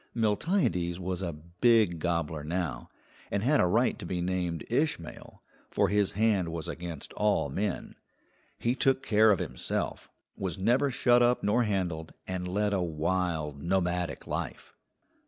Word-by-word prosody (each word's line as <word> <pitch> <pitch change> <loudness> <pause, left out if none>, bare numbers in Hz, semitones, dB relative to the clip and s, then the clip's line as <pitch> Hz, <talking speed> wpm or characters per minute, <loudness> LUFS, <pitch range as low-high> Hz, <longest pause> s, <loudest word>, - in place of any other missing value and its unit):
Miltiades 105 - +1
was 90 0 -3
a 90 -3 -2
big 85 +4 +2
gobbler 80 -3 -1
now, 80 -6 -3 0.4
and 100 - -1
had 145 +4 +3
a 90 - +4
right 115 +7 +2
to - - -7
be 90 - -2
named 90 -2 -2
Ishmael, 120 - -2 0.3
for - - +2
his 100 -1 +2
hand 105 -4 +2
was 80 -2 -5
against 85 -4 -6
all 105 -8 +1
men. 100 +7 -3 0.6
He 120 - +1
took 135 0 +2
care 110 0 +5
of 100 - +5
himself, 85 -3 -3 0.3
was 95 -5 -3
never 125 +9 +2
shut 120 -1 +4
up 120 +1 +3
nor 115 +4 +3
handled, 90 -6 -2
and 90 -1 -3
led 105 +3 0
a 95 - +1
wild, 80 -3 -1
nomadic 90 -1 -1
life. - - -5
90 Hz, 150 wpm, -29 LUFS, 85-110 Hz, 0.6 s, care